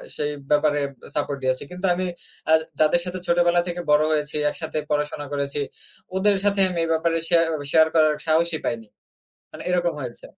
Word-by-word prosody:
সেই 150 0 -1 0.2
ব্যাপারে 145 0 +2 0.3
সাপোর্ট 145 -1 -1
দিয়েছে। 130 0 +1
কিন্তু 180 +2 -5
আমি 185 - -2 0.5
আ - - +7 0.3
যাদের 155 +3 +4
সাথে 180 +1 -4
ছোটবেলা 175 0 +3
থেকে 175 0 -3
বড় 150 +1 +5
হয়েছি, 150 -1 -1
একসাথে 160 0 -4
পড়াশোনা 150 0 -1
করেছি। 140 0 -2 0.6
ওদের 205 +1 +3
সাথে 200 -1 +3
আমি 175 -2 -3
এ - - -4
ব্যাপারে 165 +1 0
শেয়া 170 -1 +5 0.3
শেয়ার 160 -1 +6
করার 155 -1 +4
সাহসই 160 0 +2
পাইনি। 115 -2 -3 0.7
মানে - - -9
এরকম 175 -1 +1
হয়েছে। 125 -3 -7
160 Hz, 170 wpm, -23 LUFS, 150-175 Hz, 0.7 s, আ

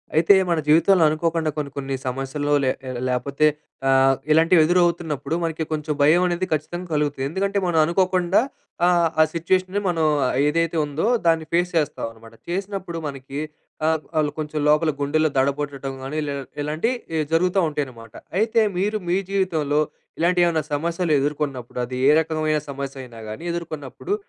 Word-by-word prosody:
అయితే, 165 +5 +6 0.2
మన 170 -2 +2
జీవితంలో 165 +4 +5
అనుకోకుండా 160 0 0
కొన్ని, 145 -2 -3
కొన్ని 135 -1 -2
సమస్యలు 135 +3 -2
లే 130 - +3 0.4
లేకపోతే 135 +4 +1 0.4
ఆహ్, 135 0 +5 0.2
ఇలాంటివి 165 +2 +5
ఎదురవుతున్నప్పుడు 170 -3 +1
మనకి 160 -1 -2
కొంచెం 155 0 -1
భయం 155 +5 +5
అనేది 175 +1 -1
ఖచ్చితంగా 175 +4 -3
కలుగుతుంది. 145 -3 0
ఎందుకంటే 195 +4 -1
మనం 175 -2 0
అనుకోకుండా 180 +1 +2 0.5
ఆహ్, 175 -2 +4
ఆ - - +8
సిట్యుయేషన్‌ని 185 +4 0
మనం 165 -2 0 0.4
ఏదైతే 165 +2 +1
ఉందో, 145 +5 -2 0.2
దాన్ని 165 -1 +3
ఫేస్ 175 +1 +2
చేస్తామనమాట. 115 -6 -3 0.2
చేసినప్పుడు 190 -1 -4
మనకి 135 0 -6 0.5
ఆహ్, 160 -1 +1 0.2
ఆళ్ళు 150 -1 +2
కొంచెం 150 0 -3
లోపల 150 +1 +3
గుండెల్లో 155 +2 +1
దడబొట్టటం 140 0 -1
గానీ, 135 +3 -4
లె 140 - -2 0.3
ఇలాంటి 155 +9 -1 0.3
ఎ - - +1
జరుగుత 180 +3 +2
ఉంటాయి 150 -1 -2
అనమాట. 115 -3 -13 0.3
అయితే, 225 +1 +2 0.2
మీరు 205 +3 0
మీ 180 - +3
జీవితంలో 160 -7 +1 0.4
ఇలాంటి 175 +2 +2
ఏమన్నా 165 -2 +1
సమస్యలు 170 +3 -1
ఎదుర్కొన్నప్పుడు 140 -4 -3
అది 125 +1 -6
ఏ - - +7
రకమైన 155 -1 0
సమస్య 140 0 -5
అయినా 120 -3 -12
గాని 110 +9 -7
ఎదుర్కొన్నప్పుడు, 165 - -5
155 Hz, 150 wpm, -22 LUFS, 140-175 Hz, 0.5 s, ఆ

